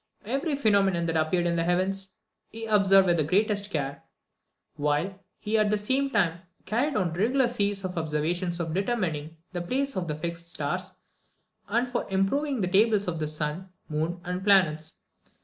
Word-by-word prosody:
Every 275 +7 -1
phenomenon 200 -9 +2
that 165 -1 -1
appeared 160 +3 +1
in 170 0 +1
the 165 - +1
heavens, 190 +2 0 0.3
he 225 0 -7
observed 195 -3 +5
with 175 -2 +3
the 155 - +2
greatest 205 +5 +1
care; 145 -5 -3 0.7
while 150 +7 -1 0.2
he 220 +1 0
at 210 -1 +3
the 210 - +2
same 260 +7 0
time 175 -8 +1 0.3
carried 265 +6 0
on 175 -3 0
regular 240 +8 +2
series 205 -4 -1
of 185 0 -4
observations 165 +3 -1
for 170 - -2
determining 170 -7 -2 0.2
the 175 - -2
places 270 +9 -1
of 180 -2 -2
the 150 - -2
fixed 170 +2 -5
stars, 180 +4 -3 0.7
and 235 +4 +1
for 245 -1 -3
improving 240 +8 0
the 185 - +1
tables 205 +2 +3
of 165 -2 -2
the 155 - -1
sun, 155 +4 -4 0.2
moon, 160 +3 -2
and 180 +1 -4
planets. 175 -6 +3
185 Hz, 170 wpm, -27 LUFS, 170-210 Hz, 0.7 s, observed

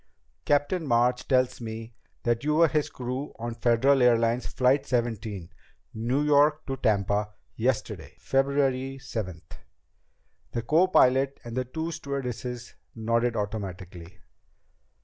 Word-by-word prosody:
"Captain 145 +5 +1
March 125 +1 +2
tells 130 -2 +2
me 115 0 -7 0.3
that 120 0 0
you 150 +1 +1
were 165 +1 +6
his 150 0 0
crew 130 +3 -5
on 120 +1 -4
Federal 120 +4 +3
Airlines 120 0 +3
Flight 135 +2 +2
Seventeen, 110 -7 -2 0.4
New 120 +6 0
York 150 +1 +3
to 135 - -3
Tampa, 105 -1 0 0.2
yesterday, 120 +1 -2
February 135 -1 0
seventh." 105 -11 -7 0.9
The 120 - -2
copilot 140 -5 +3
and 120 -1 -7
the 130 0 -1
two 160 +6 -4
stewardesses 125 -6 -5 0.2
nodded 115 +1 0
automatically. 95 -4 -5
125 Hz, 115 wpm, -27 LUFS, 115-135 Hz, 0.9 s, were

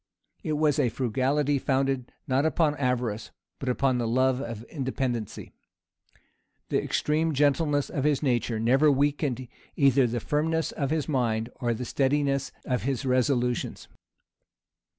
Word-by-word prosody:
It 155 -4 -2
was 150 -1 +2
a 130 -4 +3
frugality 135 +4 0
founded 135 -2 0 0.2
not 135 0 +2
upon 160 -1 +2
avarice, 125 -5 -1 0.3
but 135 - -3
upon 130 0 +1
the 120 - -1
love 130 +2 +2
of 115 -5 -6
independency. 130 -5 -4 1.2
The - - +1
extreme 155 +1 0
gentleness 145 +1 +2
of 135 - -2
his 150 -1 +1
nature 120 -4 0
never 135 +7 +4
weakened 140 -2 0 0.3
either 135 -2 +4
the 120 +1 -2
firmness 160 +6 0
of 140 -3 -2
his 155 -1 -1
mind 115 -6 0
or 120 -2 0
the 125 +3 -5
steadiness 140 +1 0
of 125 -2 -1
his 135 -1 -2
resolutions. 125 -1 0
135 Hz, 135 wpm, -27 LUFS, 125-145 Hz, 1.2 s, never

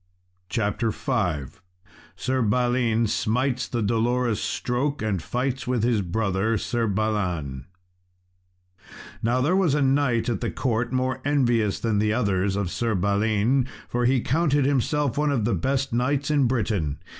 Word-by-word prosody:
CHAPTER 115 0 0
V 105 - -1 0.7
Sir 130 +8 -1
Balin 120 0 +2
Smites 125 +4 0
the 120 -3 -2
Dolorous 115 +1 +1
Stroke, 130 +2 -2
and 100 -5 -1
Fights 125 - -2
with 125 -3 0
his 115 -3 +2
Brother, 100 +3 0
Sir 115 +2 -1
Balan 90 -11 -2 1.5
Now 120 +2 +1
there 155 +8 +2
was 180 -7 +2
a 150 - +1
knight 135 -4 +2
at 115 -5 -1
the - - -1
court 120 -1 -1
more 130 0 -1
envious 120 -8 +1
than 110 -3 0
the 105 0 +1
others 100 -4 0
of 100 -3 -2
Sir 115 -3 -1
Balin, 105 +6 +1 0.2
for 120 0 -1
he 130 0 +3
counted 145 0 +1
himself 140 0 +1
one 150 -1 +2
of 120 -7 0
the 115 - +1
best 135 -1 -1
knights 135 +4 0
in 145 -4 +3
Britain. 105 - -1
120 Hz, 145 wpm, -24 LUFS, 105-130 Hz, 1.5 s, he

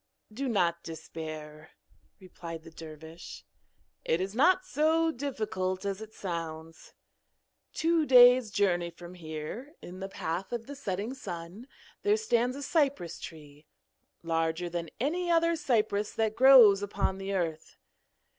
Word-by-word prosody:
'Do 270 +5 -3
not 170 -6 +1
despair,' 155 -1 -8 0.5
replied 170 -3 -9
the 165 - -12
dervish, 160 +1 -10 0.6
'it 160 - +1
is 190 +2 -3
not 360 +10 +3
so 325 -1 +2
difficult 215 -9 -3
as 200 +1 -3
it 220 0 -9
sounds. 165 -4 -7 0.8
Two 325 -2 +1
days' 250 -2 +7
journey 180 -4 +1
from 175 +1 -12
here, 170 - -7
in 180 +1 -10
the 195 0 -5
path 175 +1 -4
of 235 -1 -4
the 285 - -8
setting 210 -2 -4
sun, 185 -1 -8 0.3
there 415 +1 +3
stands 250 - +1
a 285 - -6
cypress 280 - 0
tree, 150 -2 -11 0.6
larger 165 +1 -1
than 170 -1 -4
any 345 +8 -1
other 335 0 +3
cypress 220 -8 0
that 220 -1 0
grows 240 -6 +8
upon 195 -1 -2
the 195 0 -4
earth. 165 -3 -3
195 Hz, 135 wpm, -29 LUFS, 165-260 Hz, 0.8 s, grows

